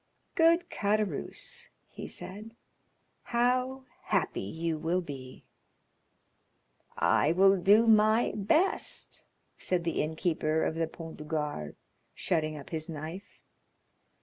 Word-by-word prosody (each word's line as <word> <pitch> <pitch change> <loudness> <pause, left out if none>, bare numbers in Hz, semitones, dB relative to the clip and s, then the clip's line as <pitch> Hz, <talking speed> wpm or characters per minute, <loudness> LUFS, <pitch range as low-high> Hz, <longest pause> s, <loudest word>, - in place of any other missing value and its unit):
"Good 335 +1 +3
Caderousse," 215 - -1 0.2
he - - -7
said, 215 +4 -9 0.7
"how 255 +2 0 0.2
happy 195 -4 0
you 160 +10 -3
will 170 +4 0
be." 135 -6 -9 1.5
"I 155 - +3
will 195 +2 +6
do 200 +5 +5
my 220 +1 +4
best," 310 - 0 0.3
said 180 -2 0
the 165 -1 0
innkeeper 160 0 0
of - - 0
the 165 0 -1
Pont 165 0 -9
du 150 - -8
Gard, 150 - -3 0.4
shutting 155 -3 -1
up 140 - -11
his 160 0 -3
knife. 160 +5 -8
180 Hz, 110 wpm, -30 LUFS, 160-220 Hz, 1.5 s, will